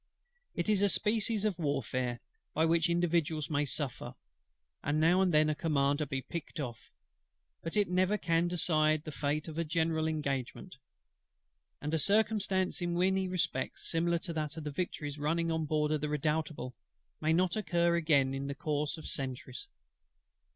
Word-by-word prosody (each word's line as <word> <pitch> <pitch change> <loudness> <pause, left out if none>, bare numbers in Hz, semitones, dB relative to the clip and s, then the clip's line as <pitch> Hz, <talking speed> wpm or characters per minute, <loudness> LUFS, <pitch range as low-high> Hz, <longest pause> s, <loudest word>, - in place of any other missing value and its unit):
It 170 - -1
is 210 -2 +3
a 200 - +4
species 215 0 +2
of 195 -5 0
warfare 130 -5 -1 0.3
by 160 - +3
which 165 +1 +3
individuals 165 -3 +1
may 145 0 +1
suffer, 140 -2 -3 0.7
and 145 +2 +1
now 170 +4 +4
and 185 -2 +3
then 155 -1 +4
a 155 - +2
Commander 145 -2 +1
be 135 -1 -3
picked 170 -2 -6
off: 120 -6 -6 0.7
but 165 +5 -4
it 205 -1 +3
never 185 +3 +2
can 170 -2 +1
decide 155 -3 +2
the 155 - -6
fate 150 +1 -1
of 160 0 -5
a - - +2
general 160 0 0
engagement; 140 -5 -3 1.0
and 150 +2 -4
a 160 - +2
circumstance 200 -1 +2
in 175 0 -1
many 190 +1 +2
respects 180 -7 -2
similar 170 +1 +2
to 170 0 -6
that 155 -1 -3
of 160 - -5
the 150 - -4
Victory's 145 -2 -4
running 165 +3 0
on 160 -1 0
board 150 0 +1
of 155 -2 0
the 150 - -1
Redoutable, 150 -3 -1 0.5
may 155 - +1
not 180 +1 +2
occur 170 -5 +2
again 145 -5 +3
in 135 +1 -3
the 140 - -4
course 150 -1 -1
of 160 - -10
centuries. 135 - -4
160 Hz, 170 wpm, -32 LUFS, 150-175 Hz, 1.0 s, a